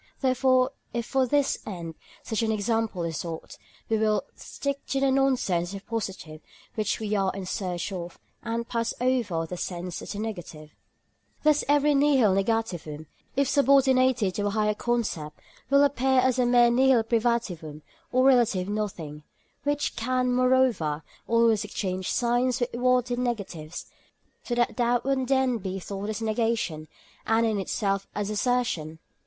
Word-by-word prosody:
Therefore 255 0 +3 0.2
if 235 -1 -1
for 265 0 +1
this 285 +2 +1
end 170 -5 -6 0.3
such 220 - -2
an 225 -1 +1
example 220 -3 -1
is 165 -2 -3
sought, 165 -2 -6 0.3
we 220 -1 +1
will 215 -1 +2
stick 280 0 -5
to 275 - 0
the 270 0 +2
nonsense 255 -11 +1
as - - -8
the 200 - -5
positive 190 -8 -5 0.3
which 215 -2 -1
we 215 -1 -3
are 195 -2 +1
in 195 -1 -5
search 185 0 -3
of, 175 -2 -6 0.2
and 230 0 -3
pass 230 -1 -2
over 235 -10 0
the 180 +2 -6
sense 175 0 -5
as - - -6
the - - -6
negative. 175 -8 -6 0.7
Thus 300 -1 +4
every 290 0 +4
nihil 275 -7 +4
negativum, 190 -7 -1 0.3
if 275 0 +2
subordinated 260 -6 +3
to 205 +1 -1
a - - +1
higher 210 0 +1
concept, 210 -10 -2 0.3
will 280 +1 +5
appear 265 -2 +2
as 255 0 +2
a 245 - +3
mere 240 -1 +5
nihil 255 -1 +4
privativum 220 -10 -1 0.3
or 255 +1 +3
relative 235 -8 +3
nothing, 185 -8 -4 0.4
which 290 0 0
can, 250 +1 0
moreover, 250 - +2 0.2
always 230 -2 +3
exchange 190 -3 -3
signs 245 +1 +1
with 245 0 -2
what 250 0 +2
it 245 - -1
negatives, 195 -10 -4 0.6
so 240 - -2
that 240 0 0
that 240 0 +2
would 270 -1 0
then 265 -3 +2
be 190 -1 -4
thought 200 +2 -5
as 220 +1 -3
negation, 215 -8 -1 0.4
and 225 +1 +3
it 220 -2 +1
itself 195 0 -1
as 205 0 -2
assertion. 210 -9 -1
225 Hz, 160 wpm, -26 LUFS, 190-255 Hz, 0.7 s, will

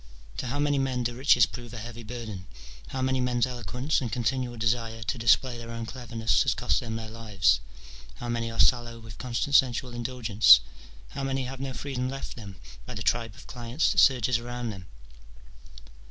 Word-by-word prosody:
To - - -3
how 135 +4 -2
many 145 -1 +2
men 130 -2 0
do 120 0 -1
riches 125 -1 +5
prove 120 -1 -9
a - - -6
heavy 120 +1 -7
burden? 110 -5 -7 0.4
how 130 -1 -3
many 130 0 +1
men's 125 -1 +1
eloquence 125 +4 -2
and 120 -4 -3
continual 125 0 -1
desire 115 0 -1
to 130 - -2
display 120 +2 +3
their 115 0 -8
own 115 0 -5
cleverness 115 -2 0
has - - +2
cost - - +1
them 110 -2 -5
their 110 0 -5
lives? 105 - +1 0.5
^ - - -17
how 120 - -6
many 115 -1 -1
are 115 - -7
sallow 120 -2 +3
with 110 -2 -12
constant 125 +3 -1
sensual 125 -1 +3
indulgence? 120 -3 +5 0.5
how 135 - -5
many 135 -1 -1
have 130 +1 -6
no 135 0 -3
freedom 130 -2 -3
left 135 +1 -6
them 100 -5 -9 0.3
by - - -6
the - - -4
tribe 115 -3 0
of - - -14
clients 120 +4 -1
that 190 - +2
surges 125 -5 +4
around 120 -1 -4
them 95 -3 -10
120 Hz, 195 wpm, -27 LUFS, 115-130 Hz, 0.5 s, riches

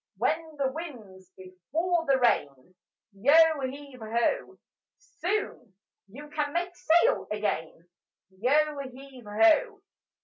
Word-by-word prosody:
When 315 0 -1
the 270 -2 0
wind's 220 - -9
before 305 - -2
the 270 -1 +4
rain, 145 - 0 0.4
Yo 305 +9 +5
heave 280 -1 -11
ho! 235 - -1 0.4
Soon 410 - -4 0.3
you 275 +9 -11
can 295 -1 -2
make 350 +1 -2
sail 345 +12 +2
again: 175 -5 -3 0.4
Yo 285 +9 +1
heave 260 -1 -13
ho! 335 - +3
280 Hz, 105 wpm, -27 LUFS, 210-330 Hz, 0.4 s, Yo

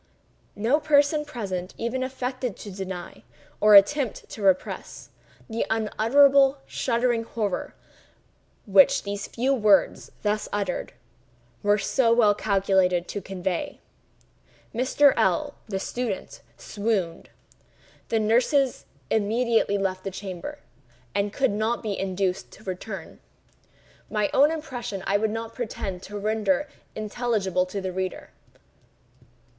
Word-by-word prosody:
No 230 +8 +2
person 300 0 +3
present 195 -10 -5
even 235 +3 -2
affected 255 -2 -3
to 205 - -8
deny, 185 - -7 0.4
or 210 -1 +7
attempted 245 +5 +4
to 220 - -8
repress, 190 -2 -1 0.4
the 225 0 -1
unutterable, 270 +5 +4
shuddering 240 -1 0
horror 210 -4 -3 0.9
which 195 -3 +5
these 200 0 -4
few 260 +4 0
words, 210 -6 +3
thus 210 0 0
uttered, 205 -1 -2 0.7
were 205 0 +3
so 230 +3 +2
well 230 -3 +5
calculated 190 -3 +1
to 205 - -4
convey. 185 -1 -3 0.9
Mr. 260 +4 +4
L—l 295 -2 +1
(the 195 -3 -2
student) 230 -1 -4 0.2
swooned. 200 -6 -2 0.8
The 225 - +2
nurses 250 +5 +2 0.3
immediately 225 0 +2
left 185 -1 -2
the 195 - -3
chamber, 195 +8 -7 0.6
and 200 0 0
could 265 +2 +1
not 220 +4 -1
be 210 -3 -2
induced 190 -1 -2
to 215 - -15
return. 190 -1 -7 0.9
My 210 -1 0
own 285 +3 +6
impressions 250 -11 -5
I 200 - +2
would 220 +1 0
not 225 +1 -5
pretend 195 -6 -5
to 205 +2 -7
render 220 +8 0 0.3
intelligible 215 -4 -1
to 200 +2 -4
the 190 -1 -3
reader. 185 0 -4
215 Hz, 120 wpm, -25 LUFS, 195-245 Hz, 0.9 s, or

